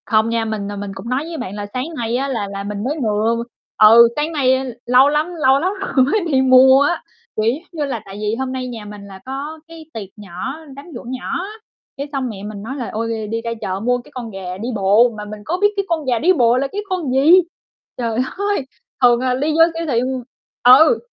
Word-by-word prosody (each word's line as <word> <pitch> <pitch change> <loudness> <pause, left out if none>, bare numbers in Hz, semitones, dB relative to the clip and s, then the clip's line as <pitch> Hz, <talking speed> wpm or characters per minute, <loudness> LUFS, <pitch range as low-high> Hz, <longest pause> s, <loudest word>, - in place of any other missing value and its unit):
Không 220 0 +2
nha, 230 -1 0
mình, 210 -2 -4
à, - - -5
mình 200 0 -5
cũng 195 +5 -8
nói 255 +3 0
với 335 -1 -6
bạn 195 -8 -6
là 205 -1 -5
sáng 255 +1 -2
nay 235 0 -2
á 275 +2 -1
là 230 -7 -2
là 200 0 -5
mình 205 0 -5
mới 295 +6 -2
vừa 225 0 0 0.3
ừ, 225 +2 +8
sáng 300 +2 -1
nay 260 -3 +1
lâu 255 +3 +5
lắm 300 +2 +1 0.2
lâu 265 +1 +5
lắm 365 +5 0
rồi 265 -9 +2
mới 310 +11 +1
đi 265 -1 +3
mua 260 +1 +6
á. 290 +4 0 0.3
Kiểu 220 +1 +2
giống 310 +6 -8
như 310 -4 -3
là, 255 -6 -4
tại 195 0 -10
vì 210 +1 -1
hôm 260 +1 -3
nay 260 -1 -4
nhà 230 -4 -7
mình 210 0 -9
là 190 -1 -11
có 280 +4 -6
cái 330 -1 -12
tiệc 205 -4 -7
nhỏ, 205 - -6 0.2
đám 280 - -11
giỗ - - -7
nhỏ 255 0 -5 0.2
á, 400 - -7 0.5
cái 280 +1 -4
xong 270 -3 -2
mẹ 200 -3 -8
mình 205 -1 -7
nói 260 +5 -5
là 250 -5 -5
"Ôi, 225 +1 -2 0.2
r - - -9
đi 230 0 -2
ra 230 0 -4
chợ 190 0 -3
mua 245 +4 +1
cái 245 - -13
con 240 -3 -6
gà 185 -2 -6
đi 225 +5 -4
bộ", 205 +4 +4
mà 210 - -6
mình 210 0 -8
có 350 - -1
biết 415 - +6
cái 395 -1 -1
con 325 -3 -1
gà 245 -3 +1
đi 360 +8 +4
bộ 240 -6 +3
là 275 +2 0
cái 410 - -3
con 355 -8 -2
gì? 270 +5 +4 0.7
Trời 230 -2 -2 0.2
ơi! 405 -7 -1 0.4
Thường, 240 -1 +6
à, 255 -1 +1
đi 290 +4 0
vô 325 +2 +5
siêu 330 0 -4
thị 240 -5 +1
m 260 -1 -3 0.4
ừ, 280 - +7
250 Hz, 255 wpm, -19 LUFS, 215-280 Hz, 0.7 s, ừ